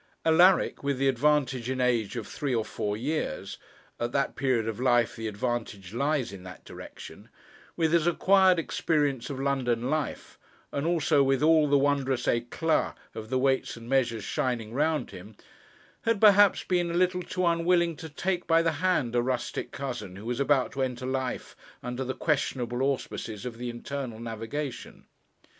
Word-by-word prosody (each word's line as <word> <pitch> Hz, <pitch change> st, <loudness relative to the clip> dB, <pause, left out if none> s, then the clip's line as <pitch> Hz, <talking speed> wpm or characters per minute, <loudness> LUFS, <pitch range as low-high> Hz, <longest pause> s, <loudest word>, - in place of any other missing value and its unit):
Alaric, 175 Hz, +3 st, +4 dB
with 140 Hz, -1 st, 0 dB
the 135 Hz, +1 st, +1 dB
advantage 135 Hz, -2 st, +1 dB
in 130 Hz, 0 st, -2 dB
age 120 Hz, -4 st, +1 dB
of 115 Hz, -3 st, -4 dB
three 140 Hz, -4 st, -3 dB
or 110 Hz, -2 st, 0 dB
four 105 Hz, 0 st, -3 dB
years 140 Hz, -, -3 dB, 0.4 s
at 120 Hz, 0 st, -2 dB
that 140 Hz, 0 st, 0 dB
period 130 Hz, -4 st, 0 dB
of 115 Hz, 0 st, -4 dB
life 120 Hz, -2 st, +2 dB
the 115 Hz, -1 st, -4 dB
advantage 105 Hz, -3 st, -4 dB
lies 140 Hz, -3 st, 0 dB
in 95 Hz, -, -9 dB
that 90 Hz, 0 st, -11 dB
direction -, -, -11 dB, 0.5 s
with 165 Hz, -1 st, +1 dB
his 170 Hz, -1 st, +3 dB
acquired 190 Hz, +1 st, +4 dB
experience 145 Hz, -5 st, 0 dB
of 135 Hz, -2 st, -5 dB
London 130 Hz, -3 st, 0 dB
life, 155 Hz, -1 st, -3 dB, 0.3 s
and 140 Hz, +3 st, -2 dB
also 160 Hz, -3 st, +3 dB
with 135 Hz, +1 st, +2 dB
all 155 Hz, -1 st, +5 dB
the 140 Hz, -, +5 dB
wondrous 135 Hz, -2 st, +1 dB
éclat 120 Hz, +7 st, 0 dB, 0.2 s
of 110 Hz, 0 st, -8 dB
the 130 Hz, -, +1 dB
Weights 130 Hz, -1 st, 0 dB
and 115 Hz, 0 st, -11 dB
Measures 120 Hz, -5 st, +1 dB
shining 115 Hz, 0 st, -2 dB
round 155 Hz, +3 st, 0 dB
him, 100 Hz, +3 st, -11 dB, 0.7 s
had 230 Hz, -2 st, +1 dB
perhaps 205 Hz, -1 st, +6 dB
been 175 Hz, -2 st, 0 dB
a 170 Hz, -, -3 dB
little 180 Hz, 0 st, +2 dB
too 180 Hz, 0 st, -2 dB
unwilling 170 Hz, 0 st, +2 dB
to 160 Hz, -, -8 dB
take 180 Hz, +4 st, -2 dB
by 165 Hz, 0 st, +4 dB
the 165 Hz, -, +2 dB
hand 160 Hz, -11 st, +1 dB
a 120 Hz, -, +4 dB
rustic 125 Hz, -1 st, -3 dB
cousin 120 Hz, -9 st, -5 dB
who 100 Hz, +3 st, -10 dB
was 120 Hz, +2 st, -2 dB
about 140 Hz, -2 st, +2 dB
to 140 Hz, -, -4 dB
enter 125 Hz, -1 st, -2 dB
life 130 Hz, -1 st, -3 dB, 0.3 s
under 125 Hz, +2 st, -3 dB
the 130 Hz, 0 st, -4 dB
questionable 130 Hz, -5 st, -1 dB
auspices 125 Hz, -5 st, -3 dB
of 120 Hz, -2 st, -6 dB
the 125 Hz, 0 st, -4 dB
Internal 120 Hz, -1 st, -5 dB
Navigation. 115 Hz, +4 st, -6 dB
135 Hz, 170 wpm, -28 LUFS, 120-155 Hz, 0.7 s, perhaps